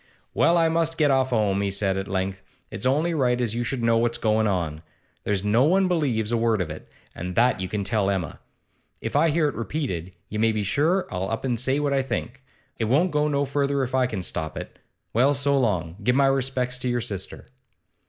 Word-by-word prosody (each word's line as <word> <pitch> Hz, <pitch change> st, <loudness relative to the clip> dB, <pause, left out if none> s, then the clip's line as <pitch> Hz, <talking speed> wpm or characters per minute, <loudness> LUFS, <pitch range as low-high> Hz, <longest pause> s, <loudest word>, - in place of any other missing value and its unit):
'Well, 170 Hz, -, +3 dB
I 165 Hz, -1 st, +4 dB
must 165 Hz, 0 st, 0 dB
get 150 Hz, -3 st, +3 dB
off 130 Hz, -1 st, +2 dB
'ome,' 105 Hz, -4 st, +1 dB
he 100 Hz, -, 0 dB
said 100 Hz, 0 st, 0 dB
at 95 Hz, 0 st, -3 dB
length. 95 Hz, 0 st, -2 dB, 0.3 s
'It's 130 Hz, -, -2 dB
only 155 Hz, +6 st, +1 dB
right 125 Hz, -5 st, +1 dB
as 120 Hz, -3 st, 0 dB
you 120 Hz, +1 st, -1 dB
should 120 Hz, 0 st, -3 dB
know 115 Hz, 0 st, +3 dB
what's 120 Hz, 0 st, +1 dB
goin' 110 Hz, 0 st, +1 dB
on. 85 Hz, -6 st, -2 dB, 0.4 s
There's 100 Hz, -2 st, 0 dB
no 110 Hz, +6 st, +3 dB
one 190 Hz, +4 st, +3 dB
believes 130 Hz, -11 st, 0 dB
a 120 Hz, -, +2 dB
word 115 Hz, -2 st, +1 dB
of 85 Hz, -4 st, -2 dB
it, 75 Hz, -, -10 dB, 0.2 s
and 90 Hz, +1 st, -6 dB
that 120 Hz, -2 st, +3 dB
you 95 Hz, -, -3 dB
can 100 Hz, +2 st, -3 dB
tell 100 Hz, -1 st, +1 dB
Emma. 95 Hz, -6 st, -3 dB, 0.6 s
If -, -, -5 dB
I 165 Hz, -, +4 dB
hear 155 Hz, 0 st, +2 dB
it 145 Hz, -, -2 dB
repeated, 110 Hz, -, -4 dB
you 105 Hz, -, -4 dB
may 110 Hz, 0 st, +3 dB
be 105 Hz, -1 st, -1 dB
sure 160 Hz, -, +1 dB
I'll 90 Hz, +1 st, -2 dB
up 115 Hz, +3 st, -3 dB
an' 125 Hz, -2 st, 0 dB
say 130 Hz, +4 st, +1 dB
what 145 Hz, -1 st, 0 dB
I 135 Hz, -, +2 dB
think. 125 Hz, 0 st, -4 dB, 0.4 s
It 115 Hz, -, +1 dB
won't 150 Hz, +11 st, +2 dB
go 150 Hz, 0 st, +1 dB
no 140 Hz, -1 st, +1 dB
further 140 Hz, 0 st, 0 dB
if 130 Hz, -, -4 dB
I 130 Hz, -1 st, +3 dB
can 105 Hz, -6 st, -4 dB
stop 80 Hz, -3 st, -3 dB
it. -, -, -8 dB, 0.3 s
Well, 135 Hz, +5 st, +3 dB
so 140 Hz, +1 st, +2 dB
long! 90 Hz, -, 0 dB
Give 125 Hz, +3 st, +2 dB
my 140 Hz, 0 st, +4 dB
respects 130 Hz, -2 st, 0 dB
to 125 Hz, -, -2 dB
your 120 Hz, 0 st, 0 dB
sister. 95 Hz, -4 st, -5 dB
120 Hz, 230 wpm, -24 LUFS, 100-140 Hz, 0.6 s, I